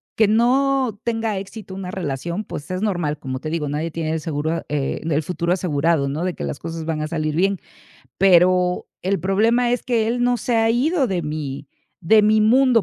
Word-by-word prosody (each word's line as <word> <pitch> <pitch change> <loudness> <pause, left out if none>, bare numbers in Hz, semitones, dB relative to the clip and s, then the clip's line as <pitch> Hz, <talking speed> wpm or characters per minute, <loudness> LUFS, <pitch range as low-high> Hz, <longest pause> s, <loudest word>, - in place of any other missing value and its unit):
que 220 -2 +4
no 250 0 +2
tenga 225 -3 -1
éxito 200 0 -9
una 185 -1 -6
relación, 170 +3 -3
pues 145 - -8
es 185 +2 -2
normal. 175 -8 -1
Como 130 -2 -5
te 155 - -5
digo, 155 -3 -2
nadie 155 +3 -2
tiene 160 -1 -3
el 160 - -1
seguro, 155 -1 -2
ah, 165 - -2
eh, 145 -2 -2
el 150 0 +1
futuro 175 +1 -1
asegurado, 160 -4 +1
no 155 +6 -2
de 180 - -1
que - - -6
las - - -4
cosas 165 -1 -5
van 160 -2 -2
a 155 - -2
salir 155 -2 -2
bien. 195 +2 +2 0.6
Pero 180 -1 +4 0.2
el 190 -1 0
problema 225 +6 +2
es 245 - 0
que 230 -4 +1
él 245 +1 0
no 245 0 +2
se 235 +1 -1
ha 225 0 +3
ido 275 +4 +2
de 180 -5 -2
mi 150 -2 -5 0.3
de 215 +6 +5
mi 215 +1 +4
mundo, 245 0 +4
180 Hz, 210 wpm, -21 LUFS, 155-220 Hz, 0.6 s, de